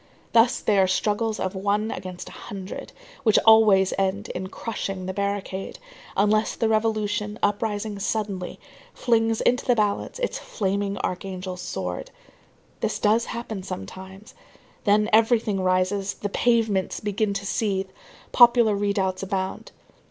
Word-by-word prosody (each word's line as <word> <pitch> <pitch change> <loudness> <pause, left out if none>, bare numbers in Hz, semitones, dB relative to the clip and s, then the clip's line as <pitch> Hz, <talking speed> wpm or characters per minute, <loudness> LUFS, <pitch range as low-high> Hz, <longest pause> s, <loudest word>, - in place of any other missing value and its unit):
Thus 235 +2 +4
they 205 -2 +2
are 190 - +4
struggles 210 +3 0
of 185 - -2
one 205 +3 0
against 185 -1 -7
a - - -9 0.2
hundred, 195 -1 -7 0.3
which 220 -5 +4
always 215 -4 +6
end 195 +1 -1
in 185 +1 -4
crushing 195 -4 -4
the 190 - -3
barricade; 200 -1 -3 0.4
unless 215 +2 +2
the 225 - 0
revolution, 215 -1 0
uprising 205 0 -1
suddenly, 200 -3 -3 0.4
flings 225 -2 +1
into 250 +1 +2
the 245 - +3
balance 210 - 0
its - - -2
flaming 200 - -2
archangel's 185 0 -4
sword. 90 - -4 0.7
This - - -1
does 220 +3 +2
happen 230 -4 -5
sometimes. 190 - -8 0.5
Then 210 0 +4
everything 220 -3 +3
rises, 185 +2 +1
the 205 - -4
pavements 220 -4 +1
begin 205 0 -1
to 195 0 -3
seethe, 195 -2 -1 0.4
popular 235 -3 +6
redoubts 200 -2 0
abound. 190 -1 -3
205 Hz, 130 wpm, -24 LUFS, 190-220 Hz, 0.7 s, always